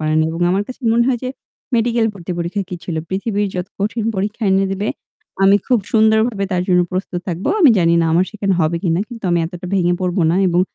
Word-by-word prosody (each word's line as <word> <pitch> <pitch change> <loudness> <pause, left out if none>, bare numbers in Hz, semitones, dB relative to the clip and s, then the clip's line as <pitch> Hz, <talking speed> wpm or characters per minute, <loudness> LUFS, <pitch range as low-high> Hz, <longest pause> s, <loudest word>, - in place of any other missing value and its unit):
পারে 155 0 0
নি 155 - +3
এবং 165 - -5
আমার 195 +3 +1
কাছে 255 - -9
মনে 235 +1 +3
হয় 250 -2 +1
যে - - -2 0.5
মেডিকেল 230 -1 +2
ভর্তি 180 -2 -6
পরীক্ষা 175 +4 -2
কি - - -5
ছিল? 165 -3 -4
পৃথিবীর 205 +1 -1
যত 180 0 -3
কঠিন 215 +2 -1
পরীক্ষা 210 +4 -3
এনে 195 +1 +3
দেবে 200 +2 -2 0.5
আমি 195 +1 +6
খুব 250 -3 +3
সুন্দরভাবে 220 -1 +3
তার 180 -1 +1
জন্য 180 -1 +4
প্রস্তুত 185 -1 -3
থাকব। 175 +2 -4 0.2
আমি 295 -7 +7
জানি 170 -1 +3
না 165 - +2
আমার 175 +3 +4
সেখানে 200 -3 -1
হবে 160 +2 +1
কিনা 170 -1 +1
কিন্তু 235 -4 -10
আমি 175 - +2
এতটা 175 +1 -8
ভেঙে 175 -2 +2
পড়ব 180 -1 -1
না 170 - +1
এবং 175 +1 +2
195 Hz, 225 wpm, -18 LUFS, 175-220 Hz, 0.5 s, আমি